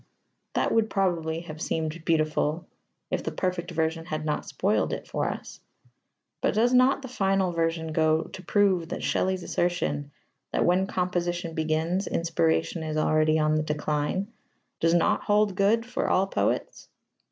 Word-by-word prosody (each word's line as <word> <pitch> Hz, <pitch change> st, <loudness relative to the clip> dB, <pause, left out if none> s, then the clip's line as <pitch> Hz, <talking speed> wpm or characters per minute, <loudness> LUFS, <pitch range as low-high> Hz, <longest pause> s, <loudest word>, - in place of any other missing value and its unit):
That -, -, +1 dB
would 225 Hz, -1 st, +2 dB
probably 170 Hz, -5 st, 0 dB
have 155 Hz, -2 st, -9 dB
seemed 160 Hz, 0 st, -2 dB
beautiful 155 Hz, +1 st, +1 dB, 0.5 s
if -, -, 0 dB
the -, -, -3 dB
perfect 180 Hz, -2 st, -2 dB
version 165 Hz, -1 st, -1 dB
had 155 Hz, -2 st, -4 dB
not 150 Hz, -, -2 dB
spoiled 205 Hz, +3 st, 0 dB
it -, -, -5 dB
for -, -, -1 dB
us. -, -, -7 dB, 0.8 s
But -, -, +1 dB
does 240 Hz, +3 st, +3 dB
not 255 Hz, +2 st, +4 dB
the -, -, -5 dB
final 195 Hz, -6 st, +1 dB
version 165 Hz, -1 st, -1 dB
go 160 Hz, 0 st, +3 dB
to 185 Hz, -, -10 dB
prove 190 Hz, -4 st, +2 dB
that -, -, -4 dB
Shelley's 185 Hz, -1 st, 0 dB
assertion 170 Hz, -6 st, -1 dB, 0.4 s
that -, -, +1 dB
"when 185 Hz, +2 st, +3 dB
composition 175 Hz, -2 st, -2 dB
begins, 160 Hz, +4 st, 0 dB
inspiration 165 Hz, 0 st, 0 dB
is 155 Hz, -1 st, -3 dB
already 155 Hz, 0 st, +3 dB
on 155 Hz, 0 st, +2 dB
the 155 Hz, -, +2 dB
decline" 150 Hz, +7 st, -2 dB, 0.5 s
does 165 Hz, +1 st, +3 dB
not 170 Hz, -, +2 dB
hold 210 Hz, -1 st, +3 dB
good 205 Hz, +4 st, +2 dB
for 245 Hz, -, -2 dB
all 190 Hz, -, +3 dB
poets? 195 Hz, -, -2 dB
170 Hz, 155 wpm, -27 LUFS, 160-190 Hz, 0.8 s, not